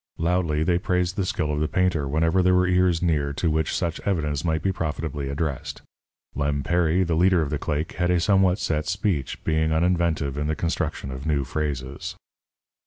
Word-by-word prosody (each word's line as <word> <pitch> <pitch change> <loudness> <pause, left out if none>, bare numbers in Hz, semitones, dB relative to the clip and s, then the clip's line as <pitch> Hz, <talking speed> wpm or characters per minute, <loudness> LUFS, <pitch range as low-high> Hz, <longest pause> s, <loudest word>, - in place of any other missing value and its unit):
Loudly 85 -2 +1
they 85 +1 +2
praised 90 0 0
the 95 -2 -1
skill 75 -4 -1
of 75 - -1
the 75 - +1
painter 90 -5 +1
whenever 80 +5 +2
there 90 0 +4
were 90 0 +4
ears 90 -2 +2
near 75 -4 +1
to 80 +3 0
which 80 0 0
such 85 -2 -2
evidence 75 -7 -1
might 80 -2 0
be 95 - +2
profitably 75 -5 -3
addressed. 70 -1 -3 0.5
Lem 70 0 -1
Perry, 85 +3 +2
the 85 -2 -1
leader 90 +1 +4
of 70 - -4
the 75 - -1
claque, 75 +2 -2
had 90 -1 0
a 90 -1 +3
somewhat 95 0 +3
set 75 -6 -1
speech, 95 -7 -1
being 80 0 +1
uninventive 80 -4 +1
in 75 - -1
the 80 - 0
construction 80 -5 -2
of 65 +4 -6
new 75 -3 +1
phrases. 70 -1 -4
80 Hz, 190 wpm, -24 LUFS, 75-90 Hz, 0.5 s, there